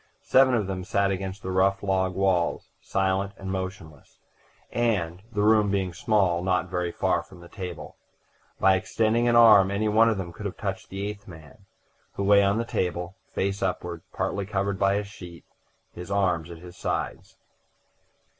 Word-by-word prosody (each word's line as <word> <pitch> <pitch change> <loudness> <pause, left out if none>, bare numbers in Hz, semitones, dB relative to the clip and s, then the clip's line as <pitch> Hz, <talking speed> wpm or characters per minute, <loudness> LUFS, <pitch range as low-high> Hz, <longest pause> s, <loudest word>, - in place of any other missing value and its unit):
Seven 130 -1 +4
of 110 -4 0
them 95 -1 -4
sat 100 +1 +1
against 95 +1 -4
the 95 - -3
rough 95 +2 +2
log 95 -1 0
walls, 95 -3 0
silent 95 +1 -1
and 95 -1 -6
motionless, 95 -6 -7 0.5
and, 95 -8 0
the 105 -2 0
room 105 -1 +4
being 95 -3 -1
small, 95 -2 +1
not 90 0 0
very 90 -1 -1
far - - 0
from 90 - -16
the 85 - -13
table. 90 -1 -8 0.6
By 95 0 +5
extending 110 +5 +1
an 120 - +3
arm 110 -5 +7
any 100 +2 0
one 110 +2 +5
of 110 - 0
them 85 -3 -5
could - - -5
have - - -8
touched - - -4
the 100 +1 -4
eighth 105 0 -8
man, 80 +2 -14 0.5
who 100 - -3
lay 100 0 +6
on 100 +1 +2
the 115 - -1
table, 90 -3 -2
face 100 +1 -2
upward, 90 -3 -3
partly 100 -1 -2
covered 100 -1 -2
by 100 0 +3
a 105 - 0
sheet, 90 -4 -12 0.5
his 90 +1 -9
arms 90 -5 0
at 85 - -9
his 90 +1 -12
sides. - - -4
95 Hz, 175 wpm, -26 LUFS, 90-100 Hz, 0.6 s, arm